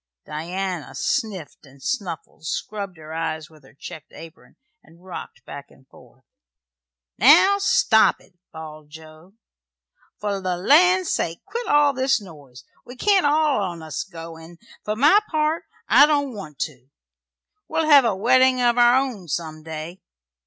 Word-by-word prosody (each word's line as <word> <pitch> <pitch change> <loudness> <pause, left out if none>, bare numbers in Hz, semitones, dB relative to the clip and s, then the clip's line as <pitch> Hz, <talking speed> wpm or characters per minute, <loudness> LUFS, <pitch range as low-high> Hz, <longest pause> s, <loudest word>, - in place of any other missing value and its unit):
Diana 175 +2 -5
sniffed 190 -9 -3
and 135 -1 -18
snuffled, 170 -4 -5
scrubbed 200 +1 -5
her 155 0 -10
eyes 160 -1 -4
with 155 -2 -20
her 135 - -20
checked 155 +1 -11
apron, 165 +1 -14 0.3
and 170 +2 -21
rocked 165 -8 -9
back 140 0 -10
and 130 - -23
forth. - - -20 1.0
"Now, 345 - +6
stop 225 - +3
it!" - - -24 0.2
bawled 155 -2 -11
Joe. 160 +3 -15 0.9
"For 200 -2 -3
the 185 -1 -2
land's 355 - +4
sake, 165 0 -3
quit 475 0 -5
all 290 -1 +4
this 265 -1 +1
noise. 145 -10 -14 0.2
We 245 - -12
can't 385 +3 +2
all 300 -4 +2
on 175 -4 -5
us 155 -1 -4
go; 165 -3 -10
'n' 165 +1 -14 0.3
for 210 - -3
my 295 - +5
part, 310 +1 -1 0.2
I 290 - +7
don't 285 -3 0
want 155 -9 -9
to. 130 -3 -6 0.8
We'll 320 0 -1
hev 285 -3 +7
a 225 -5 0
weddin' 255 +5 +3
of 245 0 +2
our 240 0 +6
own 255 -9 -2
some 155 0 -4
day!" 160 +3 -8
190 Hz, 150 wpm, -22 LUFS, 160-260 Hz, 1.0 s, I